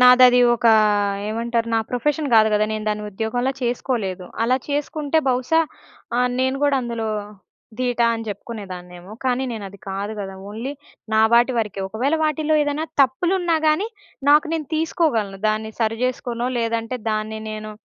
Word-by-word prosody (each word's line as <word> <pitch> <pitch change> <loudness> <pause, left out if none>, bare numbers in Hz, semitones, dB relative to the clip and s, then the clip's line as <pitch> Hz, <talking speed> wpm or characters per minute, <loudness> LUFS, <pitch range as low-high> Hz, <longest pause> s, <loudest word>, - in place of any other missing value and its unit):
నాదదీ 250 0 +8 0.2
ఒకా 230 -1 +5 0.5
ఏమంటారు 230 +1 -1
నా - - +4
ప్రొఫెషన్ 290 +4 0
గాదు 220 0 +6
గద! 210 0 +3
నేను 215 0 -3
దాన్ని 210 0 -1
ఉద్యోగంలా 235 +6 -1
చేసుకోలేదు. 225 -7 -2 0.2
అలా 250 +3 +3
చేసుకుంటే 295 +1 0
బహుశా 255 +6 +2 0.6
ఆహ్, 250 0 +2
నేను 260 +1 +1
గూడా 285 -1 +3
అందులో 235 -2 -3 0.7
ధీటా 245 -2 +1
అని 225 0 -6
చెప్పుకునేదాన్నేమో, 185 -3 -8
కానీ 255 0 +1
నేను 215 -3 -5
అది 200 +1 -14
కాదు 200 +2 -3
గదా! 195 -1 -6
ఓన్లీ 230 +7 -5 0.4
నా 220 - +5
వాటి 240 +2 +5
వరికే. 210 -3 -2
ఒకవేళ 250 +9 0
వాటిల్లో 310 0 +1
ఏదైనా 290 +2 -1 0.2
తప్పులున్నా 340 +6 +1
గానీ, 310 +8 +2 0.4
నాకు 300 +2 +6
నేను 310 -3 -3
తీసుకోగలను. 270 - 0
దాన్ని 215 0 -1
సరి 225 0 +1
చేసుకోనో 245 -1 -2
లేదంటే 230 +1 -1
దాన్ని 215 0 -2
నేను 215 0 -6
235 Hz, 150 wpm, -22 LUFS, 215-270 Hz, 0.7 s, నాదదీ